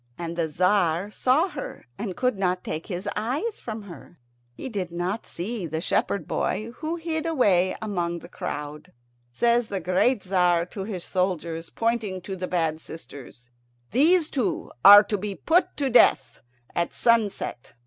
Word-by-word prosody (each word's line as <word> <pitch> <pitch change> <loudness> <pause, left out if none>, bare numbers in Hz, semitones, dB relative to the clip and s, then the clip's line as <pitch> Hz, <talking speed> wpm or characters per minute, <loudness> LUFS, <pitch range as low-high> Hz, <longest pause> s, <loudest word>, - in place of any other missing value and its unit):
And 170 -1 -5
the 170 -1 0
Tzar 180 +2 +1
saw 265 - +2
her, 295 -5 -8
and 190 - -5
could 250 -2 +1
not 180 -2 -1
take 155 - -5
his 185 0 -4
eyes 270 - -2
from 220 -2 -6
her. 175 -2 -12 0.3
He 120 - -8
did 195 -8 -4
not 180 +5 -3
see 190 +1 -4
the 160 +1 -3
shepherd 175 0 -1
boy, 220 +2 -2
who 320 +1 -3
hid 325 -1 -2
away 190 - +3
among 175 -5 -2
the 170 - -11
crowd. 150 -5 -6 0.4
Says 235 - +2
the 200 -2 -3
great 185 +7 +2
Tzar 180 -2 +2
to 190 +1 -7
his 190 -5 -5
soldiers, 170 -3 -2
pointing 225 -5 -1
to 190 +2 -6
the 185 0 -4
bad 160 -3 -1
sisters, 130 -7 -12 0.4
"These 315 - +3
two 255 -6 -2
are 205 +1 +11
to 210 -1 -2
be 200 0 -4
put 340 - +1
to 280 - 0
death 135 - +4 0.4
at 170 0 -1
sunset. 220 - 0
190 Hz, 160 wpm, -25 LUFS, 170-230 Hz, 0.4 s, are